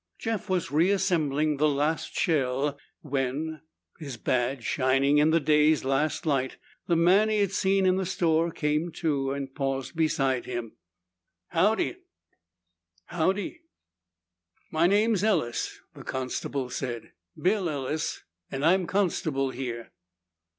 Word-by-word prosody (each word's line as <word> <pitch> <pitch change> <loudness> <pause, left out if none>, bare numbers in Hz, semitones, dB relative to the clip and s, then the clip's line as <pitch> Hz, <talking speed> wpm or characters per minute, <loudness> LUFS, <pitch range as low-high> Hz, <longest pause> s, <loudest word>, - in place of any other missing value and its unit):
Jeff 225 -2 -3
was 180 -7 -1
reassembling 155 -4 +2
the 150 +2 +3
last 150 +3 -1
shell 140 -2 +1 0.3
when, 145 +3 -2 0.4
his 140 -6 -7
badge 125 0 -1
shining 135 +2 +2
in 150 +1 +4
the 165 +1 +4
day's 150 0 +3
last 135 +5 0
light, 135 -4 0 0.3
the 170 - +3
man 185 +6 +4
he'd 205 -3 +1
seen 195 0 +2
in 185 0 +3
the 190 - -1
store 170 -2 +1
came 155 +1 -1
to 140 -5 -1
and 135 -1 -4
paused 135 0 -3
beside 135 -5 +1
him. 120 -3 -5 0.7
"Howdy." 215 - +1 1.1
"Howdy." 190 - -1 1.1
"My 160 +2 +3
name's 210 +1 +2
Ellis," 170 - 0
the - - -11
constable 130 0 -3
said. 120 -4 -5 0.3
"Bill 190 -1 +1
Ellis 150 +1 -3 0.3
and 135 +2 -2
I'm 180 +1 +3
constable 155 -9 0
here." 120 -3 -5
155 Hz, 120 wpm, -27 LUFS, 135-180 Hz, 1.1 s, in